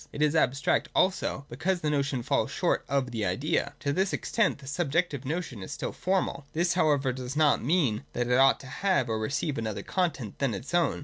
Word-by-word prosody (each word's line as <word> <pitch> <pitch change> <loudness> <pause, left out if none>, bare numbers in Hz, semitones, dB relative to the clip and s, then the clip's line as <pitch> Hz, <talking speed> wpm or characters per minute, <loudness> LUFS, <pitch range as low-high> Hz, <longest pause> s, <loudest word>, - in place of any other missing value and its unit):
It 150 - -1
is 150 +1 +2
abstract 135 -2 +2
also, 185 -7 +1
because 175 +8 -1
the 150 - 0
notion 140 -3 0
falls - - +1
short - - 0
of 135 -3 0
the 115 -3 -2
idea. 130 - 0
To 140 -3 0
this 190 +3 0
extent 230 -4 +1
the 140 - -14
sub 140 +2 -2
jective 155 -5 0
notion 150 - -3
is 95 - -7
still - - -3
formal. 185 -6 -1
This 175 +2 +1
however 145 -6 +2
does 130 +1 -6
not 150 -1 +3
mean 135 -7 +1
that 120 - 0
it 125 +1 +3
ought 135 0 +5
to - - -12 0.2
have 180 -11 +2
or 110 -1 0
receive 135 +5 -1
another 110 -2 -3
content 155 - -2
than 135 -5 0
its 135 - -7
own. 175 -1 +2
140 Hz, 210 wpm, -28 LUFS, 125-170 Hz, 0.2 s, ought